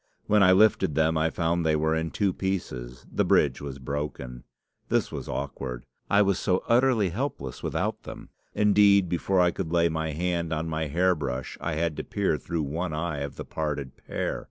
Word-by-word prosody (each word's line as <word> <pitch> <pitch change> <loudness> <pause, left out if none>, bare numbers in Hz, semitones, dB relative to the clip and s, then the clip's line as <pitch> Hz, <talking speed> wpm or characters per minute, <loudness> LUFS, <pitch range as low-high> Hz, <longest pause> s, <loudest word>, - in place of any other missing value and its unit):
When 105 0 +3
I 95 -1 +7
lifted 95 -6 +4
them 80 +1 +2
I 80 +1 +2
found 85 +1 0
they 80 -1 +2
were 80 +1 +1
in 80 0 -1
two 100 0 0
pieces; 65 -12 -4
the - - +1
bridge - - +2
was 70 -2 -6
broken. 65 -3 -5 0.4
This - - +1
was - - -6
awkward. 65 -3 -5 0.2
I 100 +1 +5
was 100 -1 +1
so 95 -2 +1
utterly 120 -5 +3
helpless 85 - -4
without - - -2
them! - - -10 0.3
Indeed, 100 -2 +5
before 90 +2 0
I 90 -1 +4
could 80 - -4
lay 85 -1 +3
my 80 -1 -2
hand 85 0 -1
on 80 +1 -2
my 80 -1 -2
hair 90 +5 +2
brush 65 -5 -4
I 80 - -2
had 80 0 -1
to - - -3
peer 95 -7 -1
through 80 +3 -3
one 80 +4 -3
eye 80 -1 -2
of 70 0 -5
the - - -7
parted 75 -4 -4
pair. - - -3
80 Hz, 195 wpm, -27 LUFS, 75-95 Hz, 0.4 s, I